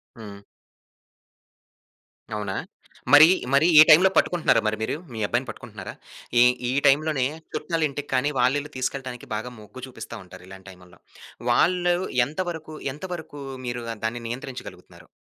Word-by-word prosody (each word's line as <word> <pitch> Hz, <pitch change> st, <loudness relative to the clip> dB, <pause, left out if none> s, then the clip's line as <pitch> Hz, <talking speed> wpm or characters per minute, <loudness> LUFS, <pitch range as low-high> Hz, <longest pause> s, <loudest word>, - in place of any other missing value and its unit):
హ్మ్. 105 Hz, -4 st, -11 dB, 1.9 s
అవునా! 100 Hz, -2 st, -4 dB, 0.6 s
మరీ, 150 Hz, +2 st, +10 dB, 0.3 s
మరీ 140 Hz, +4 st, +5 dB
ఈ -, -, +12 dB
టైం‌లో 170 Hz, +5 st, +8 dB
పట్టుకుంటున్నారా 175 Hz, -2 st, +3 dB
మరి 110 Hz, 0 st, -1 dB
మీరు, 110 Hz, -, -1 dB, 0.2 s
మీ 110 Hz, -, -6 dB
అబ్బాయిని 120 Hz, +4 st, -1 dB
పట్టుకుంటున్నారా? 105 Hz, -3 st, -9 dB, 0.5 s
ఈ -, -, +7 dB, 0.3 s
ఈ -, -, 0 dB, 0.2 s
టైంలోనే 140 Hz, -1 st, +2 dB, 0.3 s
చుట్టాలింటికి 155 Hz, -4 st, -2 dB
కానీ, 130 Hz, +3 st, +2 dB
వాళ్ళిల్లు 145 Hz, +4 st, +1 dB
తీసుకెళ్లడానికి 130 Hz, -1 st, -4 dB
బాగా 110 Hz, +4 st, -5 dB
మొగ్గు 105 Hz, +4 st, -12 dB
చూపిస్తా 120 Hz, -2 st, -9 dB
ఉంటారు 90 Hz, 0 st, -14 dB
ఇలాంటి 95 Hz, +1 st, -13 dB
టైముల్లో. 90 Hz, -1 st, -18 dB, 0.5 s
వాళ్ళు 175 Hz, +6 st, +3 dB, 0.3 s
ఎంతవరకు 160 Hz, +1 st, -5 dB, 0.2 s
ఎంతవరకు 160 Hz, -2 st, -8 dB, 0.3 s
మీరు 120 Hz, 0 st, -3 dB, 0.2 s
దాన్ని 120 Hz, +2 st, -3 dB
నియంత్రించగలుగుతున్నారు? 125 Hz, +2 st, -9 dB
130 Hz, 120 wpm, -24 LUFS, 110-155 Hz, 1.9 s, ఈ